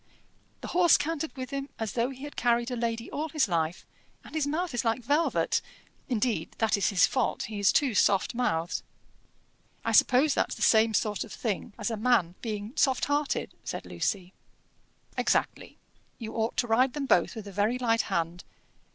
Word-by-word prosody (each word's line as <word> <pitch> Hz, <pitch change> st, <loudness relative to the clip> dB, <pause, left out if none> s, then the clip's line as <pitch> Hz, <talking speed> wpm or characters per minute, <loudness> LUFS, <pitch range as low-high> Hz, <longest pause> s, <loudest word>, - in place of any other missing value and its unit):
"The -, -, -6 dB
horse 350 Hz, -2 st, +5 dB
cantered 320 Hz, -1 st, -3 dB
with 255 Hz, -1 st, -6 dB
him 275 Hz, 0 st, -4 dB
as 225 Hz, -3 st, -3 dB
though 235 Hz, +1 st, 0 dB
he 265 Hz, 0 st, -9 dB
had 290 Hz, -, -8 dB
carried 240 Hz, +1 st, +1 dB
a -, -, -1 dB
lady 230 Hz, -1 st, -3 dB
all 310 Hz, +2 st, -3 dB
his 305 Hz, -5 st, +1 dB
life, 165 Hz, -1 st, -1 dB, 0.4 s
and -, -, -14 dB
his 310 Hz, -3 st, 0 dB
mouth 325 Hz, +1 st, -2 dB
is 245 Hz, -, -1 dB
like 230 Hz, +1 st, 0 dB
velvet; 295 Hz, +7 st, +1 dB, 0.5 s
indeed, 220 Hz, -8 st, -1 dB
that 225 Hz, -1 st, +2 dB
is 200 Hz, -, +1 dB
his 195 Hz, -3 st, +5 dB
fault 260 Hz, -3 st, -1 dB
he 215 Hz, -2 st, -5 dB
is 200 Hz, -, +4 dB
too 275 Hz, -5 st, +2 dB
soft 200 Hz, -1 st, +3 dB
mouthed." 175 Hz, -9 st, -1 dB, 1.0 s
"I -, -, +1 dB
suppose 270 Hz, +4 st, +5 dB
that's -, -, 0 dB
the -, -, -3 dB
same 220 Hz, 0 st, +4 dB
sort 210 Hz, -2 st, 0 dB
of 220 Hz, -, -12 dB
thing 215 Hz, -2 st, -3 dB
as 220 Hz, 0 st, -2 dB
a 225 Hz, -, -2 dB
man 220 Hz, -7 st, +2 dB
being 215 Hz, 0 st, -4 dB
soft 265 Hz, -3 st, +2 dB
hearted," 290 Hz, 0 st, -1 dB
said -, -, -5 dB
Lucy. 190 Hz, -3 st, -3 dB, 0.9 s
"Exactly: -, -, 0 dB, 0.4 s
you 225 Hz, -2 st, -7 dB
ought 225 Hz, 0 st, -1 dB
to -, -, +2 dB
ride 250 Hz, +3 st, +3 dB
them 290 Hz, -2 st, -3 dB
both 265 Hz, -, +2 dB
with 215 Hz, -2 st, -7 dB
a -, -, -7 dB
very 205 Hz, +5 st, +1 dB
light 230 Hz, -2 st, +2 dB
hand. 170 Hz, +1 st, -2 dB
235 Hz, 185 wpm, -28 LUFS, 210-270 Hz, 1.0 s, horse